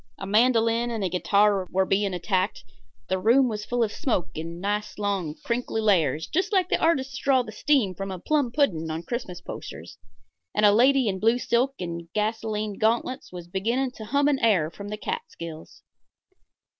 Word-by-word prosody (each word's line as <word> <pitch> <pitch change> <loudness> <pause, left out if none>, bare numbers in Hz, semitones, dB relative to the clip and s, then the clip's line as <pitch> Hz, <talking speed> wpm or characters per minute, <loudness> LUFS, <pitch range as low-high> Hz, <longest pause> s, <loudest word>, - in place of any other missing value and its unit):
A 195 - -6
mandolin 230 +2 +3
and 225 -3 -3
a 185 - 0
guitar 200 +1 +2
were 190 +1 +1
being 195 +1 +1
attacked; 185 +1 -1 0.4
the 190 - 0
room 240 +7 +4
was 210 -2 -4
full 245 -1 0
of 215 - -1
smoke 235 - -1
in 165 +2 -6
nice, 210 +2 -2
long 195 -7 -2
crinkly 235 -1 -1
layers 165 -8 +2
just 370 +5 -1
like 375 -4 +2
the - - +2
artists 275 -4 +1
draw 265 -2 +3
the 215 - -9
steam 235 -4 +1
from 195 +2 -5
a 190 - -4
plum 285 - 0
pudding 180 - +1
on 160 +1 -4
Christmas 190 -7 -5
posters, - - -9 0.6
and 210 - +4
a 205 - +7
lady 255 +3 +4
in 190 -2 0
a - - -9
blue 225 +4 +3
silk 250 +2 +1
and 170 -1 -5
gasolined 215 -1 -2
gauntlets 235 +3 0
was 175 -1 -8
beginning 230 +8 -1
to 220 -3 -10
hum 280 +5 +2
an 285 -2 +2
air 185 -9 +2
from 200 +3 -9
the 210 +1 -5
Catskills. 190 - -7
210 Hz, 185 wpm, -25 LUFS, 185-245 Hz, 0.6 s, a